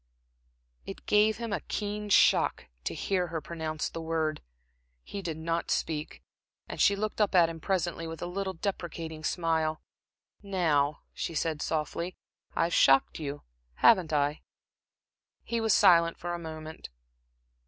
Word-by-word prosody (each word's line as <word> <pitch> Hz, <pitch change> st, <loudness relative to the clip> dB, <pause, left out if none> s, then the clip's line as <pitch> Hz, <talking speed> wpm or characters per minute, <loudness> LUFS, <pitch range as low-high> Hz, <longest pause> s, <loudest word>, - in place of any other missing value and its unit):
It -, -, -9 dB
gave 210 Hz, +1 st, +4 dB
him 230 Hz, -2 st, -4 dB
a -, -, 0 dB
keen 210 Hz, 0 st, -4 dB
shock -, -, +4 dB, 0.2 s
to -, -, -2 dB
hear 185 Hz, -3 st, 0 dB
her 165 Hz, -1 st, -3 dB
pronounce 155 Hz, -1 st, -4 dB
the 165 Hz, -, -6 dB
word. 160 Hz, -1 st, -1 dB, 0.6 s
He 200 Hz, -, -6 dB
did 165 Hz, -4 st, -4 dB
not 165 Hz, +1 st, -2 dB
speak, 155 Hz, -1 st, -2 dB, 0.4 s
and -, -, -4 dB
she 200 Hz, -, +5 dB
looked 215 Hz, +1 st, -2 dB
up 205 Hz, -2 st, +2 dB
at 170 Hz, -2 st, +6 dB
him 165 Hz, -1 st, -7 dB
presently 175 Hz, -2 st, -1 dB
with 165 Hz, 0 st, -7 dB
a -, -, -4 dB
little, 190 Hz, +2 st, -3 dB
deprecating 165 Hz, -4 st, -4 dB
smile. 160 Hz, -2 st, 0 dB, 0.6 s
"Now," 155 Hz, -8 st, +1 dB
she 165 Hz, -, -4 dB
said, 155 Hz, 0 st, -1 dB
softly 165 Hz, +3 st, -2 dB, 0.4 s
"I've 170 Hz, +1 st, +1 dB
shocked 135 Hz, +3 st, +4 dB
you, 145 Hz, -2 st, -5 dB, 0.3 s
haven't 185 Hz, -8 st, +5 dB
I?" 145 Hz, 0 st, +1 dB, 1.0 s
He 235 Hz, -1 st, -2 dB
was 220 Hz, -1 st, +2 dB
silent 170 Hz, -3 st, +5 dB
for 175 Hz, 0 st, -4 dB
a 175 Hz, -, -3 dB
moment. 160 Hz, -1 st, -8 dB
165 Hz, 145 wpm, -29 LUFS, 155-190 Hz, 1.0 s, at